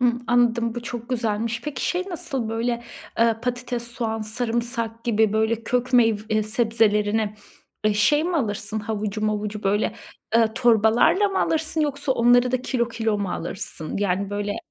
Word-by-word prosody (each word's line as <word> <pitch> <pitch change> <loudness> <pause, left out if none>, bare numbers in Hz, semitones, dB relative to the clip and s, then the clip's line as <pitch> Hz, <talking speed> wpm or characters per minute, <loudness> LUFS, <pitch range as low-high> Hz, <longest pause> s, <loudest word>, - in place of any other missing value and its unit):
Hımm 245 0 +2
anladım. 235 -1 +2
Bu 240 - -5
çok 235 0 -6
güzelmiş. 230 -1 -1
Peki 285 -3 -4
şey 360 0 0
nasıl 270 - -3
böyle, 235 +1 -1 0.4
ııı, 230 -1 +3
patates 245 -1 -3
soğan 225 -2 -3
sarımsak 230 0 -2
gibi 220 -2 +2
böyle 220 +1 +1
kök 250 +2 -1
meyv 225 -4 +4
eee, 215 0 +2
sebzelerini, 215 -1 +1 0.5
eee, 215 -1 +3
şey 295 +9 +3
mi 350 0 0
alırsın 215 -4 -2
havucu 215 -1 -3
mavucu 210 0 -2
böyle, 205 +2 +1 0.4
ııı, 225 -1 +3
torbalarla 235 - +4
mı 390 - -1
alırsın 320 0 0
yoksa 285 -2 0
onları 245 0 +4
da 255 -1 0
kilo 235 -3 0
kilo 225 -2 -1
mu 200 -3 -2
alırsın? 165 -2 -4
Yani 200 0 0
böyle 205 0 -2
230 Hz, 160 wpm, -23 LUFS, 215-245 Hz, 0.5 s, meyv